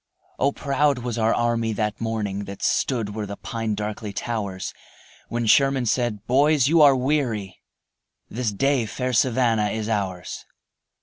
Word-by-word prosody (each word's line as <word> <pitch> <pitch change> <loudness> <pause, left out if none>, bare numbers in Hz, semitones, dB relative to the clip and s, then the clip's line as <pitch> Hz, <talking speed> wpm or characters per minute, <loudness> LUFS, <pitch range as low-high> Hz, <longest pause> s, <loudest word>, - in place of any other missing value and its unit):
O, 140 +2 +3
proud 140 0 +1
was 120 -1 -4
our 110 0 +3
army 115 -1 0
that 105 +1 -2
morning 105 -3 -2
That 100 0 -8
stood 115 -6 0
where 105 -1 -4
the 100 - -6
pine 115 -2 -3
darkly 105 0 -4
towers, 100 -4 -4 0.5
When 120 0 -2
Sherman 135 +2 +4
said: 115 -3 -1
"Boys, 140 +1 +3
you 165 +2 +4
are 140 -2 +7
weary, 125 -8 -1 0.7
This 115 -1 -2
day 130 +2 +1
fair 125 +3 -3
Savannah 115 -3 +2
is 110 +1 -3
ours." 95 -5 -3
115 Hz, 145 wpm, -23 LUFS, 105-130 Hz, 0.7 s, are